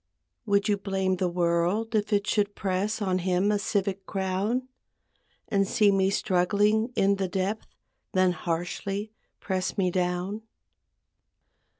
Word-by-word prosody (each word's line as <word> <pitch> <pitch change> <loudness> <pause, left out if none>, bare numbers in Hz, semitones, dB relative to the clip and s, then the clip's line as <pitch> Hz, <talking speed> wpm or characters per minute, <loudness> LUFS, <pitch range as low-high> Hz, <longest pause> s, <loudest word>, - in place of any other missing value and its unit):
Would 200 +1 +2
you 205 -1 +2
blame 190 -2 -1
the 180 0 0
world 175 +6 0
if 215 0 0
it 205 -1 +2
should 205 -1 0
press 200 +3 -1
On 185 -2 +1
him 185 +3 +1
a 205 - +1
civic 195 -1 -2
crown; 195 +6 -1 0.8
And 195 -1 +1
see 205 0 +4
me 190 -1 +3
struggling 205 +4 +2
in 200 0 +3
the 195 -1 -1
depth 190 +4 -2 0.5
Then 185 -1 +4
harshly 180 +5 -3 0.3
press 185 0 -2
me 185 -2 +2
down? 180 +3 -1
195 Hz, 130 wpm, -27 LUFS, 185-205 Hz, 0.8 s, see